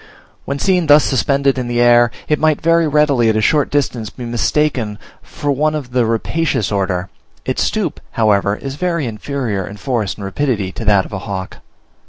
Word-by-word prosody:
When 140 - -3
seen 180 +1 +1
thus 150 0 +7
suspended 140 0 +1
in 125 - -3
the 120 0 -1
air, 120 0 +5 0.2
it 150 - +1
might 155 -2 +2
very 165 0 +3
readily 145 -6 +3
at 110 - +1
a - - +2
short 145 +6 +2
distance 125 -6 -1
be 125 - -9
mistaken 120 -2 0 0.2
for 145 - -4
one 155 +3 +1
of 135 -5 -5
the 120 -2 +1
Rapacious 125 - -1
order; 95 -2 -1 0.4
its - - -1
stoop, - - -1
however, 100 -2 +2
is 135 +4 -7
very 170 -4 -1
inferior 115 -3 -3
in 105 - -9
force 115 -3 -2
and 100 - -7
rapidity 105 -3 -1
to 115 - -7
that 100 -3 +3
of - - -11
a 95 - -3
hawk. 95 -1 -6
125 Hz, 190 wpm, -17 LUFS, 105-145 Hz, 0.4 s, thus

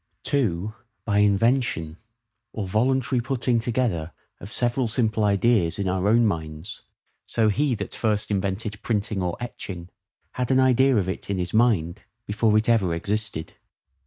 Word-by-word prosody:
(2) 110 -7 0 0.3
By 105 -2 +2
INVENTION, 105 -5 +2 0.6
or 105 -4 -3
voluntary 125 +4 +1
putting 125 -1 0
together 110 -9 -1 0.3
of 100 - -10
several 120 +1 0
simple 110 -1 0
ideas 100 -3 +2
in 100 -1 -1
our 95 +1 0
own 115 +2 +4
minds: 80 -1 -4 0.5
so 110 -2 +2
he 135 +4 +1
that 100 -2 -6
first 105 -2 -1
invented 100 +2 -2
printing 105 -3 -1
or 90 -1 -2
etching, 95 -7 -7 0.4
had 125 -1 -3
an 130 -1 +4
idea 130 0 +4
of 95 -3 +1
it 95 - -5
in 100 - -1
his 90 -1 -3
mind 105 -8 +2 0.2
before 105 +1 +2
it 110 - +1
ever 100 -8 +2
existed. 105 -2 -3
105 Hz, 150 wpm, -24 LUFS, 95-120 Hz, 0.6 s, own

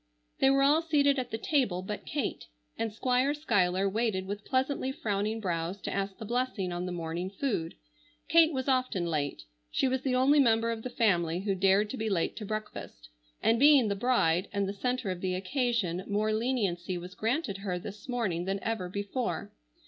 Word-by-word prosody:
They 270 - +5
were 275 0 +4
all 295 +3 +5
seated 285 -4 +3
at 250 - -3
the 225 - -3
table 225 - 0
but 210 +2 -6
Kate, 285 -6 -3 0.3
and 225 -1 -2
Squire 255 +5 +1
Schuyler 195 - +1
waited 205 -2 0
with 205 +1 -5
pleasantly 265 0 0
frowning 215 -2 -2
brows 175 -1 -2
to - - -4
ask 195 -1 -2
the 220 - -7
blessing 240 -5 -1
on 175 +1 -3
the - - -3
morning 170 +1 -3
food. 200 -6 -2 0.5
Kate 330 0 +6
was 260 -2 -3
often 255 -9 +1
late. 150 -4 -2 0.3
She - - +1
was 260 0 0
the 265 -2 0
only 275 +4 +5
member 230 -3 +3
of 225 -1 -4
the 255 - -5
family 180 - +1
who 200 0 0
dared 195 +2 +3
to 265 - -5
be 220 -1 -1
late 180 -5 0
to 215 - -5
breakfast, 215 - -6 0.3
and 230 +1 +3
being 280 -5 +6
the 200 - 0
bride 195 -6 +2
and 200 -1 0
the 195 - -3
centre 245 0 -1
of 180 -1 -5
the 185 -1 -1
occasion 195 -4 -1
more 215 +1 +1
leniency 205 -7 -1
was 180 +1 -8
granted 225 - -1
her 190 -3 -2
this 200 +6 -9
morning 200 -9 -1
than 195 +1 -1
ever 225 -6 -2
before. 205 +6 -3
215 Hz, 195 wpm, -30 LUFS, 185-255 Hz, 0.5 s, Kate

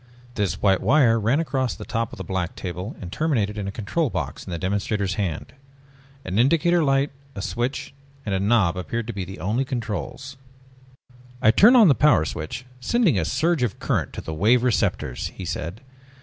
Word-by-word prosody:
This 100 -8 -2
white 95 -2 +4
wire 125 -6 +4
ran 115 +8 +2
across 135 -5 -1
the - - -9
top 115 -1 -2
of - - -10
the 95 - -5
black 90 -1 -3
table 90 +5 -5
and 90 -2 -8
terminated 115 - 0
in 105 -2 -4
a - - -3
control 120 +10 -1
box - - -4
in - - -10
the 85 - -3
demonstrator's 100 +1 -1
hand. 95 -6 -3 0.7
An 95 +3 -1
indicator 165 +6 +3
light, 135 0 +2 0.2
a 100 - -5
switch 125 +4 -3 0.3
and 100 - -2
a 95 - +1
knob 100 -4 +2
appeared 100 +6 -3
to 115 - -5
be 95 -2 -4
the 95 -2 -9
only 105 +10 0
controls. 130 +2 -5 1.0
"I 110 - +5
turn 215 - +7
on 230 -5 +8
the 145 - +6
Power 140 - +4
Switch, 80 +11 -5
sending 180 - +2
a - - -1
surge 165 -3 +1
of 120 -6 -1
current - - -1
to - - -5
the 80 - -6
Wave 115 +9 +3
Receptors," 100 - 0
he - - -7
said. 85 +9 -5
110 Hz, 190 wpm, -23 LUFS, 95-135 Hz, 1.0 s, on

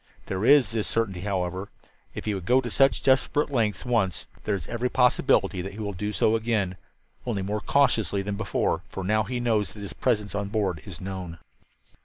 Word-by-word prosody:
There 95 +1 -3
is 130 -4 +6
this 110 -2 -1
certainty, 100 -6 -1
however: 95 -1 -2 0.5
If - - -6
he 105 - 0
would 95 -3 -5
go 125 +1 +5
to 120 -3 -4
such 135 +3 +3
desperate 145 +2 +2
lengths 115 -4 0
once, 110 -8 0 0.2
there 105 - +1
is 90 - -5
every 120 +1 -1
possibility 125 -7 +3
that 95 +2 -6
he 105 - -9
will 100 -2 -3
do 105 +4 -3
so 110 +1 +2
again 110 -5 0 0.5
only 105 -6 -2
more 105 +2 -2
cautiously 110 -8 +2
than 100 +1 -3
before, 105 0 0
for 95 - -5
now 110 +2 +2
he 125 +3 -3
knows 110 -4 0
that 105 - -10
his 100 - -6
presence 105 -5 0
on 100 0 -2
board 100 -6 -1
is 95 -5 -8
known. 95 -3 -6
105 Hz, 200 wpm, -26 LUFS, 95-120 Hz, 0.5 s, is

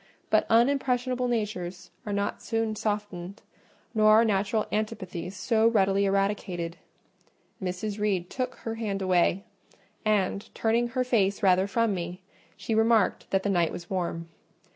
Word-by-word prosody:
But - - +3
unimpressionable 250 +1 +2
natures 195 -8 -3 0.2
are - - -2
not 200 0 -2
so - - -13
soon 225 -1 0
softened, 205 -3 -4 0.5
nor 215 -1 +4
are 220 +2 +6
natural 210 +1 +1
antipathies 190 -4 -3
so 225 +3 +2
readily 200 -3 +3
eradicated. 195 -4 -1 0.8
Mrs. 190 +3 -3
Reed 195 -4 0
took 255 +4 -3
her 225 - -5
hand 205 -4 -3
away, 185 +1 +2 0.6
and, 205 -2 0
turning 230 +2 +1
her 255 +1 -1
face 210 -5 +1
rather 190 0 +4
from 225 +1 +1
me, 175 0 -4 0.4
she 225 - -3
remarked 220 -2 +2
that 195 0 +1
the - - -1
night 170 -3 +2
was 175 +1 -8
warm. 170 -3 -2
205 Hz, 140 wpm, -27 LUFS, 185-225 Hz, 0.8 s, are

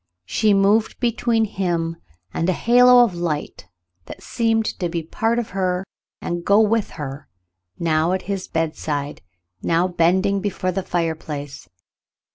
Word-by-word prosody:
She 215 - +1
moved 205 +3 +2
between 235 -1 +1
him 170 -5 -2 0.4
and 165 - 0
a - - +3
halo 245 +4 +6
of 225 -6 0
light 165 - -4 0.4
that - - -10
seemed 225 -2 0
to 175 -3 -1
be 170 0 -2
a - - -13
part 225 +8 -1
of 240 -2 -3
her 185 -1 -1 0.3
and 175 - -3
to - - -6
go 200 +3 +4
with 220 0 +2
her,, 145 -1 -6 0.5
now 160 0 +1
at 190 - -2
his 195 -1 -4
bedside, 155 -3 -3 0.4
now 170 +2 +2
bending 185 +3 +2
before 190 -2 -2
the 195 +2 -2
fireplace. 155 -6 -4
185 Hz, 150 wpm, -21 LUFS, 165-215 Hz, 0.5 s, halo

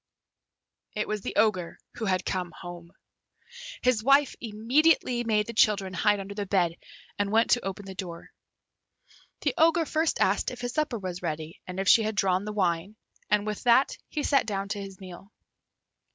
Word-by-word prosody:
It 210 - -1
was 215 -1 -2
the - - -5
Ogre 205 -5 +1 0.2
who 225 - -3
had 185 -2 0
come 180 -2 -2
home. 175 -1 -9 0.9
His 250 -4 +2
wife 275 +2 +4
immediately 240 +3 +2
made 215 -2 +1
the 230 - -7
children 200 -4 +2
hide 205 +2 +2
under 195 +1 -6
the 200 -1 -4
bed, 175 -4 +1 0.4
and 205 0 0
went 225 +1 +3
to 245 - +3
open 195 +1 -5
the 190 - -7
door. 175 -3 -8 1.1
The - - 0
Ogre 330 +1 +4
first 315 +1 0
asked - - +2
if 245 -1 -9
his 245 0 -3
supper 305 -6 -1
was 185 -3 -6
ready 160 -1 -5
and 185 +1 -5
if 195 - -2
she 225 - +7
had 215 0 -2
drawn 190 0 +1
the 210 - -4
wine, 185 0 -1 0.3
and 210 0 +2
with 210 -1 -4
that 245 +3 +4
he 300 - -3
sat 275 - +2
down 200 -1 -3
to 205 -1 -3
his 195 -1 -9
meal. 190 +2 -11
205 Hz, 180 wpm, -27 LUFS, 185-235 Hz, 1.1 s, she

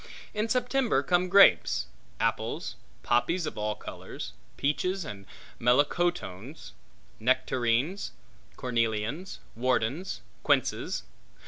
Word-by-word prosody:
In 215 +1 -1
September 250 +1 +2
come 180 0 +2
grapes; 180 - +6 0.3
apples; - - -1 0.3
poppies 165 +9 +2
of - - -4
all 105 0 -1
colors; 85 - -8 0.2
peaches; 180 +6 0 0.5
melocotones; 125 - 0 0.5
nectarines; 130 - +1 0.5
cornelians; 115 - -1 0.2
wardens; 130 +8 0 0.2
quinces. - - +1
135 Hz, 80 wpm, -29 LUFS, 115-185 Hz, 0.5 s, grapes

